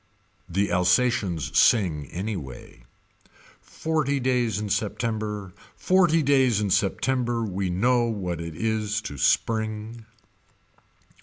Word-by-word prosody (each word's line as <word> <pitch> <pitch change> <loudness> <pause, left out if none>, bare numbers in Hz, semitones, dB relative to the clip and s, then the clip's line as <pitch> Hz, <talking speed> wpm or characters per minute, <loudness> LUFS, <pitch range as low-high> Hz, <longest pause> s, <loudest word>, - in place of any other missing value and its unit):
The 100 +3 0
Alsations 90 - +1
sing 85 - +3
anyway. 85 - -7 0.8
Forty 155 -3 -1
days 125 -4 0
in 105 0 -3
September. 105 -2 -3 0.2
Forty 175 -4 +3
days 130 -6 +3
in 105 -2 -1
September 120 +5 0
we 95 -3 -2
know 120 +7 +2
what 90 -7 -3
it 85 -1 -7
is 110 0 -1
to 70 -10 -7
spring. 110 0 -1
110 Hz, 100 wpm, -25 LUFS, 95-120 Hz, 0.8 s, sing